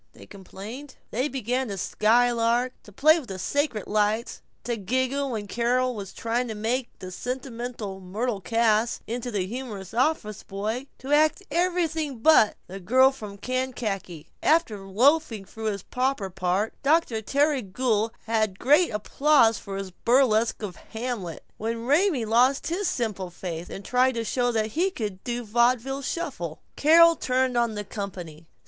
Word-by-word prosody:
they -, -, -14 dB
complained. 210 Hz, +8 st, -10 dB, 0.2 s
They 255 Hz, +5 st, 0 dB
began 255 Hz, -1 st, -2 dB
to 200 Hz, -2 st, -5 dB
skylark; 235 Hz, +4 st, +2 dB
to 210 Hz, -, -13 dB
play 310 Hz, -, +5 dB
with 265 Hz, -, -11 dB
the 190 Hz, -, -5 dB
sacred 265 Hz, +1 st, -1 dB
lights; 215 Hz, +2 st, 0 dB, 0.2 s
to 240 Hz, -, -2 dB
giggle 260 Hz, +6 st, -1 dB
when 220 Hz, -4 st, -3 dB
Carol 250 Hz, +4 st, +1 dB
was 200 Hz, -4 st, -7 dB
trying 235 Hz, +2 st, -2 dB
to 220 Hz, -, -5 dB
make 235 Hz, +4 st, -1 dB
the 185 Hz, -, -8 dB
sentimental 240 Hz, -3 st, -5 dB
Myrtle 205 Hz, +3 st, -3 dB
Cass 225 Hz, +1 st, +1 dB
into 245 Hz, +2 st, -4 dB
a 185 Hz, -, 0 dB
humorous 215 Hz, -3 st, -6 dB
office 240 Hz, -4 st, 0 dB
boy; 220 Hz, +7 st, -4 dB
to 270 Hz, -, -7 dB
act 310 Hz, +6 st, +3 dB
everything 330 Hz, -5 st, 0 dB
but 225 Hz, -3 st, +5 dB
"The 190 Hz, +2 st, -8 dB
Girl 260 Hz, +8 st, +5 dB
from 210 Hz, -7 st, -9 dB
Kankakee." 220 Hz, -9 st, -3 dB, 0.2 s
After 230 Hz, -12 st, +1 dB
loafing 235 Hz, 0 st, +2 dB
through 220 Hz, +4 st, -8 dB
his 200 Hz, -3 st, -2 dB
proper 250 Hz, -6 st, -1 dB
part 185 Hz, +3 st, -1 dB
Dr. 280 Hz, -6 st, +2 dB
Terry 280 Hz, +4 st, +1 dB
Gould 220 Hz, +1 st, 0 dB, 0.2 s
had 215 Hz, -4 st, 0 dB
great 295 Hz, -, +4 dB
applause 230 Hz, +2 st, +3 dB
for 195 Hz, -1 st, -6 dB
his 195 Hz, -1 st, -5 dB
burlesque 230 Hz, +1 st, +2 dB
of 190 Hz, -4 st, -5 dB
"Hamlet." 220 Hz, -8 st, -5 dB, 0.2 s
Even 230 Hz, +1 st, -3 dB
Raymie 290 Hz, -, +2 dB
lost 250 Hz, +7 st, +3 dB
his 370 Hz, +3 st, -1 dB
simple 210 Hz, -6 st, -2 dB
faith, 175 Hz, -1 st, -6 dB
and 195 Hz, -, -8 dB
tried 255 Hz, +1 st, +3 dB
to 230 Hz, -, -1 dB
show 245 Hz, +2 st, 0 dB
that 220 Hz, -1 st, -1 dB
he 355 Hz, -, +1 dB
could 210 Hz, -, -5 dB
do 240 Hz, -1 st, -3 dB
a -, -, -13 dB
vaudeville 245 Hz, +4 st, +1 dB
shuffle. 260 Hz, -, -4 dB, 0.2 s
Carol 335 Hz, +2 st, +6 dB
turned 255 Hz, -3 st, 0 dB
on 235 Hz, -2 st, +1 dB
the 210 Hz, -, -3 dB
company. 175 Hz, -6 st, -7 dB
235 Hz, 160 wpm, -26 LUFS, 205-260 Hz, 0.2 s, Carol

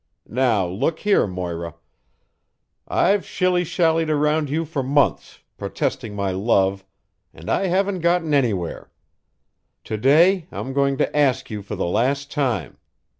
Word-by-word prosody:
Now, 115 Hz, -5 st, +1 dB
look 100 Hz, -, -2 dB
here, 210 Hz, -, +3 dB
Moira. 85 Hz, -3 st, -5 dB, 1.1 s
I've 200 Hz, -1 st, +2 dB
shilly 180 Hz, -1 st, 0 dB
shallied 165 Hz, -1 st, +1 dB
around 150 Hz, 0 st, +1 dB
you 160 Hz, +3 st, -1 dB
for 150 Hz, -3 st, -3 dB
months, 140 Hz, +2 st, 0 dB, 0.2 s
protesting 105 Hz, -2 st, -3 dB
my 100 Hz, -1 st, -1 dB
love, 95 Hz, -1 st, +1 dB, 0.5 s
and 80 Hz, -, -12 dB
I 195 Hz, -, +1 dB
haven't 190 Hz, +1 st, 0 dB
gotten 170 Hz, -2 st, +1 dB
anywhere. 105 Hz, -, -1 dB, 0.9 s
To 110 Hz, -, -4 dB
day 160 Hz, -, +4 dB
I'm 135 Hz, -, -5 dB
going 140 Hz, 0 st, +1 dB
to -, -, -1 dB
ask 140 Hz, -5 st, +1 dB
you 105 Hz, -1 st, -4 dB
for 100 Hz, -, -6 dB
the -, -, -2 dB
last 140 Hz, +10 st, 0 dB
time. 120 Hz, -, -2 dB
140 Hz, 135 wpm, -22 LUFS, 100-160 Hz, 1.1 s, day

